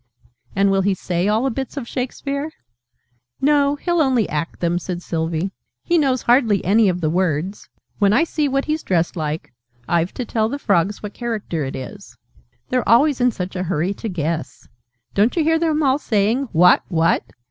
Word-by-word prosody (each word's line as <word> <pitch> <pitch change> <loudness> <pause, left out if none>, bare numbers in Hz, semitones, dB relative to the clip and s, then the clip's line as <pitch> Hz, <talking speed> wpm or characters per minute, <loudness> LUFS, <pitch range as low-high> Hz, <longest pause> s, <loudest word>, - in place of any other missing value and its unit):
"And 195 0 +3
will 195 0 +2
he 195 0 +1
say 180 +1 -1
all 215 +3 +2
the 270 - +1
Bits 265 +4 -5
of 250 -4 -4
Shakespeare?" 280 +4 -3 0.9
"No, 285 0 +3
he'll 345 +3 0
only 255 -6 +2
act 155 +2 -3
them," 175 0 0
said 180 0 -5
Sylvie. 165 +2 -2 0.3
"He 345 -1 +2
knows 260 -4 +1
hardly 235 -5 +3
any 205 +2 +4
of 180 0 -2
the 155 - +1
words. 180 +1 -1 0.3
When 200 -2 +4
I 245 +9 +4
see 310 -3 -1
what 275 0 0
he's 310 +1 -1
dressed 170 -1 0
like, 155 -4 -4 0.3
I've 170 +1 +1
to 250 - -3
tell 220 -1 0
the 280 - -3
Frogs 200 -5 0
what 210 -1 -6
character 215 -9 -3
it 135 - -5
is. 130 - -9 0.5
They're 255 -1 0
always 260 +3 +4
in 250 - +5
such 190 -4 -5
a 185 - -2
hurry 180 +1 -1
to 220 +2 -6
guess! 165 -2 -4 0.5
Don't 210 +4 +2
you 330 - +2
hear 325 +1 +2
them 315 -2 +1
all 270 0 +3
saying 225 +3 0
'What? 180 +1 +5
What?'" 165 -1 +2
210 Hz, 190 wpm, -20 LUFS, 175-270 Hz, 0.9 s, in